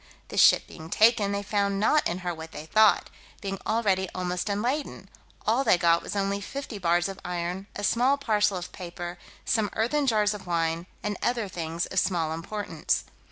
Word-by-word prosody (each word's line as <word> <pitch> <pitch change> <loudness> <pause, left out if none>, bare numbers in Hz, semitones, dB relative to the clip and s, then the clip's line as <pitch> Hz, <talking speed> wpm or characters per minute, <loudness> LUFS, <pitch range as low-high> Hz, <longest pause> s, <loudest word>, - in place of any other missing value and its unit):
The - - -6
ship - - +6
being 160 0 -11
taken, 215 0 +4
they 200 0 -2
found 200 -1 0
not 295 +8 +3
in 170 - -2
her 175 - 0
what 160 0 -9
they 150 - -7
thought, 215 +5 +4 0.3
being 195 -1 -4
already 200 -4 +1
almost 180 +1 -2
unladen. 245 +9 -2 0.4
All 235 +5 +2
they 185 - +4
got 170 -1 +3
was - - -6
only 200 0 0
fifty 260 0 -6
bars 175 0 +2
of 195 -1 -7
iron, 180 +2 -3
a 205 - -5
small 250 +7 +3
parcel 210 -7 +1
of 175 - -6
paper, 175 -1 -7 0.3
some 220 -3 +1
earthen 275 +6 +1
jars 215 -3 +3
of 205 -3 -9
wine, 165 0 0 0.2
and 210 -1 -2
other 235 -3 0
things 170 -2 -3
of 190 - 0
small 165 -4 0
importance. 205 +6 -2
200 Hz, 185 wpm, -27 LUFS, 175-215 Hz, 0.4 s, ship